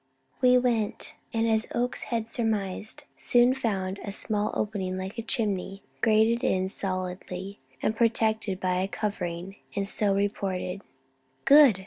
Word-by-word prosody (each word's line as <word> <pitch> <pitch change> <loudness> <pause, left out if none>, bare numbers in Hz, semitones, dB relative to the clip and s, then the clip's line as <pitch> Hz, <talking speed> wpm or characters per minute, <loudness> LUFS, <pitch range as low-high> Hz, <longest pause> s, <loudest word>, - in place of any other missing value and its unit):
We 250 -1 +6
went, 235 -4 0 0.2
and, 225 0 +1
as 220 0 +2
Oakes 245 +1 0
had 230 -2 -2
surmised, 215 -3 -2
soon 245 +1 +4
found 200 -7 -2
a - - -5
small 210 +1 +1
opening 195 -3 -2
like 190 +5 -5
a - - 0
chimney, 200 -4 -2 0.2
grated 225 +1 +3
in 190 0 +1
solidly 185 0 -4 0.2
and 220 - +1
protected 220 -4 +1
by 185 -1 0
a 190 - 0
covering, 195 -3 -4 0.2
and 200 0 -1
so 200 -1 +3
reported. 195 -2 -2 0.6
"Good!" 280 -8 +7
205 Hz, 135 wpm, -27 LUFS, 190-225 Hz, 0.6 s, Good